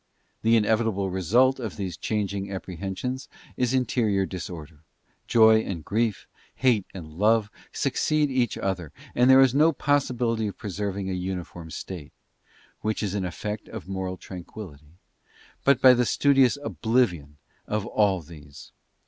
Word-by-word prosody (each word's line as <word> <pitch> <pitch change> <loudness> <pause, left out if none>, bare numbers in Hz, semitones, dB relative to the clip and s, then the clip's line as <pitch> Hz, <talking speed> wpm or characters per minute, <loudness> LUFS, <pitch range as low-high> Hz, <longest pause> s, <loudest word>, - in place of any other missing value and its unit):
The 115 +1 +4
inevitable 110 -3 +1
result 120 +9 +3
of 110 -7 -5
these 95 -4 -4
changing 100 0 -2
apprehen 95 0 -5
sions 130 +1 -4 0.3
is 125 -1 0
interior 115 -6 +1
disorder: 80 -4 -8 0.4
joy 110 -1 +6
and 90 -7 -5
grief, 110 -1 -1 0.3
hate 115 -6 +2
and 90 -5 -8
love 105 +4 +2 0.2
suc~ - - -1
ceed 150 -2 +1
each 125 -4 0
other, 90 -6 -3 0.2
and 125 +1 +4
there 130 0 +8
is 130 -2 +5
no 155 +4 +5
possibility 125 -6 0
of 100 - -6
preserving 100 -1 -4
a 95 - -2
uniform 90 -2 -5
state—which 95 +6 -8
is 100 -2 -2
an 100 -2 -1
effect 105 +4 -5
of 110 -5 -8
moral 95 -1 -4
tranquillity—but 90 - -5
by 130 -1 +8
the 125 -1 +1
studious 135 -2 +4
oblivion 95 - 0 0.3
of 105 -1 -1
all 100 -4 +1
these. 75 -3 -13
105 Hz, 140 wpm, -26 LUFS, 90-120 Hz, 0.4 s, there